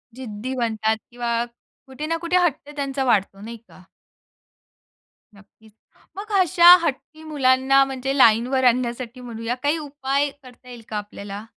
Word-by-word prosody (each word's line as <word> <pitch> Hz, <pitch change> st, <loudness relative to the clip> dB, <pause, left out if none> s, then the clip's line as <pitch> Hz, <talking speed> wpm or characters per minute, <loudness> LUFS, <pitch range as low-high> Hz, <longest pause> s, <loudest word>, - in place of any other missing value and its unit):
जिद्दी 250 Hz, 0 st, -6 dB
बनतात 220 Hz, -2 st, -1 dB
किंवा 240 Hz, -1 st, -3 dB, 0.5 s
कुठे 265 Hz, +3 st, -7 dB
ना 330 Hz, 0 st, -1 dB
कुठे 360 Hz, +2 st, +2 dB
हट्ट 295 Hz, -2 st, -3 dB
त्यांचा 275 Hz, -1 st, -3 dB
वाढतो 200 Hz, -5 st, 0 dB
नाही 230 Hz, +2 st, -8 dB
का? 215 Hz, -4 st, -20 dB, 1.5 s
नक्कीच. 210 Hz, +2 st, -21 dB, 0.5 s
मग 425 Hz, +2 st, -8 dB
अशा 355 Hz, -1 st, +7 dB
हट्टी 305 Hz, +2 st, -4 dB
मुलांना 270 Hz, -2 st, +3 dB
म्हणजे 270 Hz, +1 st, -4 dB
लाईनवर 245 Hz, +2 st, +4 dB
आणण्यासाठी 245 Hz, 0 st, -1 dB
म्हणूया, 235 Hz, 0 st, -5 dB
काही 290 Hz, +3 st, +1 dB
उपाय 285 Hz, -1 st, -2 dB
करता 250 Hz, 0 st, -17 dB
येईल 240 Hz, -2 st, -10 dB
का 215 Hz, -, -4 dB
आपल्याला? 205 Hz, 0 st, -8 dB
255 Hz, 135 wpm, -22 LUFS, 230-280 Hz, 1.5 s, अशा